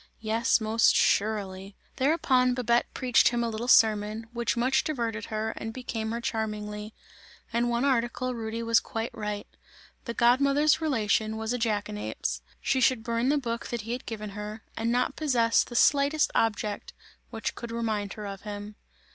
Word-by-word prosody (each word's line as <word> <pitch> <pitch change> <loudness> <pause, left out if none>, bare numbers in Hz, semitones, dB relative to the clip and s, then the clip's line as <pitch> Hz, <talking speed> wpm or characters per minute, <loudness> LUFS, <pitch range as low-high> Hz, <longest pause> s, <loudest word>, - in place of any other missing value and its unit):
Yes, 225 +3 +2
most 220 +1 +3
surely! 195 -2 0 0.2
Thereupon 260 -3 +3
Babette 240 -1 +1
preached 250 -2 +3
him 235 0 +1
a 235 - -1
little 225 +2 -4
sermon, 215 -1 +4
which 235 -1 -1
much 265 +3 +2
diverted 230 -7 -2
her 220 0 -2
and 225 - -5
became 225 -2 -4
her 235 - -2
charmingly; 215 -3 -4 0.6
in 235 +1 +1
one 240 +2 +1
article 255 -1 0
Rudy 230 0 -4
was 230 0 +4
quite 225 +1 -4
right; 210 -1 -4 0.6
the 235 - -4
god 240 +2 +4
mother's 290 +3 +3
relation 220 -6 +1
was 220 +2 -2
a 245 - -2
jackanapes! 210 -2 -2 0.2
She 265 - +1
should 245 -2 +3
burn 235 +2 0
the 295 - +3
book 235 -4 -3
that 240 -2 -3
he 225 +3 -6
had 250 +2 -5
given 215 -2 -5
her, 210 +2 -7
and 230 +1 -1
not 250 +2 +1
possess 240 -7 +2
the 240 - -10
slightest 285 +4 +3
object 210 -2 -1 0.4
which 225 - -3
could 235 - -7
remind 220 -3 -2
her 210 - -7
of 195 -1 -6
him. 205 0 -7
230 Hz, 170 wpm, -28 LUFS, 215-245 Hz, 0.6 s, sermon